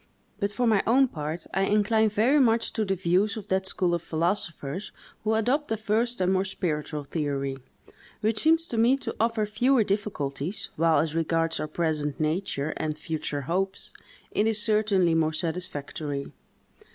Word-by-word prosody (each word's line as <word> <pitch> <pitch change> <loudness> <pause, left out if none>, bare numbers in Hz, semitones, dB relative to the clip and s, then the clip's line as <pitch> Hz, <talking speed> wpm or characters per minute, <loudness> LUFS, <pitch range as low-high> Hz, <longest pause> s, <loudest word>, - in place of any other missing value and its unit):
But, 200 -1 0
for 245 +4 0
my 215 -4 +4
own 265 +4 +5
part, 155 0 -5
I 195 - +1
incline 215 +2 +3
very 230 +8 +3
much 230 -3 +2
to 220 - 0
the 195 -2 0
views 185 +4 +1
of 210 - -8
that 190 0 +1
school 180 -2 0
of 170 - 0
philosophers 170 0 -2 0.3
who 220 +1 +1
adopt 260 +7 +1
the 225 - -1
first 225 +3 0
and 185 0 +2
more 190 0 +2
spiritual 155 -6 -3
theory, 140 -2 -2 0.6
which 215 0 +1
seems 325 +3 +3
to 230 - -1
me 245 +4 +5
to - - -5
offer 225 -1 +1
fewer 235 +4 +3
difficulties, 195 -5 -2
while, 165 0 +3
as 155 +1 +1
regards 165 0 +1
our - - -2
present 155 -2 -1
nature, 155 -2 -1
and 155 -1 -2
future 150 -2 -3
hopes, 190 +7 -2 0.4
it 210 - +2
is 220 -1 +1
certainly 210 -5 +2
more 160 -1 +2
satisfactory. 155 -4 -3
190 Hz, 165 wpm, -27 LUFS, 155-220 Hz, 0.6 s, own